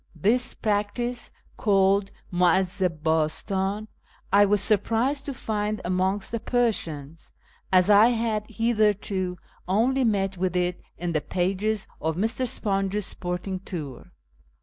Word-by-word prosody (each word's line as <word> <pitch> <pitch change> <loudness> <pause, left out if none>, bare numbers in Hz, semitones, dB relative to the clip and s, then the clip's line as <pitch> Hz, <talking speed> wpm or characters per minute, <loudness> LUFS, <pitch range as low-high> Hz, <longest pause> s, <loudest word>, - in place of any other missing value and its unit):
This 235 +10 +2
practice 220 +4 -1 0.3
(called 195 -1 +3 0.2
muivdzi 180 +1 +2 0.2
hastan) 190 +6 0 0.5
I 205 +1 +7
was 205 +1 +3
surprised 230 +7 +1
to 280 - -4
find 210 -2 -2
amongst 185 +2 0
the 230 - -2
Persians, 165 - -2 0.4
as 185 -1 +5
I 210 +2 +7
had 225 -3 0
hitherto 210 -5 0 0.3
only 245 +8 +2
met 195 -4 0
with 180 0 -1
it 180 0 0 0.2
in 175 0 -3
the 155 - +1
pages 195 +5 -1 0.2
of 160 0 -1
Mr. 225 +7 0
SiJonges 195 -2 -1
Sporting 180 +1 -4
Tour. 155 - -7
200 Hz, 120 wpm, -25 LUFS, 180-220 Hz, 0.5 s, I